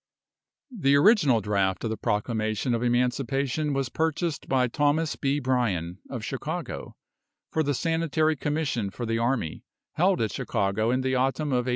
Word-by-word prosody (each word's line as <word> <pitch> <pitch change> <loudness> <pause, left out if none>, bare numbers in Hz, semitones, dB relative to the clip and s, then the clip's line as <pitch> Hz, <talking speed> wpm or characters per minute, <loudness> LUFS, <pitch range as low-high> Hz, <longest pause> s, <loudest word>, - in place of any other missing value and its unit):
The 140 -9 +3
original 145 - +5
draft 95 -2 0
of 115 - -1
the - - -1
proclamation 110 +3 -1
of 115 - 0
Emancipation 125 +4 0
was 135 -2 -1
purchased 160 +1 -2
by 130 -1 +3
Thos. 145 +5 +1
B. 140 0 0
Bryan, 105 - -1
of - - -5
Chicago, - - -5 0.6
for 160 - +1
the 145 -2 0
Sanitary 160 0 +1
Commission 145 -8 -1
for 120 +5 -5
the 115 0 0
Army, 115 - -1 0.3
held - - +2
at - - 0
Chicago 100 +3 0
in 130 +2 +1
the 130 0 0
autumn 135 +4 0
of 125 -2 +1
1863. - - -2
130 Hz, 160 wpm, -26 LUFS, 115-145 Hz, 0.6 s, original